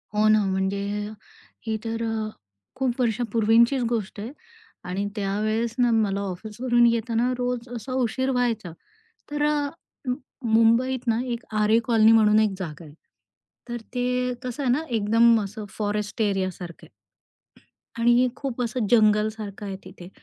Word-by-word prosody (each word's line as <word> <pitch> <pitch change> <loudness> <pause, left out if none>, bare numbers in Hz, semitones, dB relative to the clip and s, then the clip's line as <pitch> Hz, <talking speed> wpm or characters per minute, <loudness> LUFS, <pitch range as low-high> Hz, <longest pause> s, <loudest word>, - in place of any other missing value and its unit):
हो 215 +1 +4
ना 215 -1 +5
म्हणजे 190 +1 -1 0.9
ही 220 0 0
तर 230 0 -3
अ, 220 -1 -2 0.5
खूप 255 -1 -1
वर्षांपूर्वीचीच 230 +2 +3
गोष्ट 215 -3 -3
आहे 225 +5 -5 0.6
आणि 195 +3 -2
त्यावेळेस 215 +3 -1
ना 245 -1 +4
मला 205 -3 +1
ऑफिसवरून 220 +6 0
येताना 235 +1 +1
रोज 245 0 -2
असा 240 +3 -6
उशीर 260 +1 0
व्हायचा 230 -7 -1 0.6
तर 295 0 -1
अ, 295 -1 0 0.8
मुंबईत 230 +3 +3
ना 230 0 +2
एक 240 -1 -4 0.2
आरे 215 +2 +4
कॉलनी 225 -2 +5
म्हणून 215 -1 +5
एक 215 -1 +3
जागा 170 -2 -6
आहे. 145 - -13 0.8
तर 240 - -3 0.2
ते 250 0 0
कसं 255 +3 -4
आहे 250 - +2
ना 285 +6 +2
एकदम 230 +1 +4
असं 210 +2 -6
फॉरेस्ट 210 0 -3
एरियासारखं 185 -4 -2
आहे - - -42 0.9
आणि 240 +2 +5
खूप 265 -3 -4
असं 235 -1 -1
जंगलसारखं 215 -2 +2
आहे 195 - -4
तिथे. 180 -1 -11
225 Hz, 140 wpm, -25 LUFS, 210-245 Hz, 0.9 s, ना